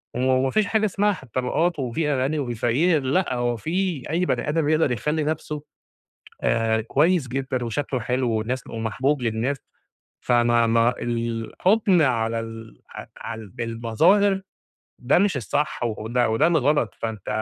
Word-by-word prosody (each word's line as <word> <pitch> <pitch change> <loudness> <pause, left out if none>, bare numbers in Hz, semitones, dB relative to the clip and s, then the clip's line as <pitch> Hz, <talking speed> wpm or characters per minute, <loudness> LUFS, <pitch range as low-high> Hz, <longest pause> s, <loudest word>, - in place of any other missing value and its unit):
و - - -2
وما 130 +1 +2
فيش 215 -1 +2
حاجة 215 +1 +1
اسمها 205 +1 +1
ح 160 - -10
الطبقات 130 +7 -1
وفي 145 +4 -1
غني 140 +4 0
وفي 125 -4 -2
الفقير 140 +8 +2
لأ، 140 +3 +1
هو 120 -1 -1
في 170 - -2
أي 175 +3 +1
بَني 150 - -1
آدم 155 -1 +1
يقدر 155 -4 +2
يخلّي 150 +6 -1
نفسه 150 -1 -3 0.8
آآ 115 -1 +1
كويس 145 +5 +2
جدًا 130 -1 -2
وشكله 130 +2 -2
حلو 125 0 -1
والناس 115 +4 -2
ومحبوب 125 +5 -1
للناس، 115 +4 -1 0.7
فما 120 -1 +3
ما 115 +2 +3
الحُكم 120 - +1
على 115 -4 +1
ال 115 0 -9 0.4
على 110 -1 -6
ال 105 - -11
بالمظاهر 120 - +2 0.6
ده 125 +7 +3
مش 190 -6 +2
الصح 145 +5 -2
و 110 -3 -1
وده 120 +2 0
وده 115 +9 +3
الغلط، 145 - +1
فأنت 110 -4 -5
130 Hz, 150 wpm, -23 LUFS, 115-155 Hz, 0.8 s, فما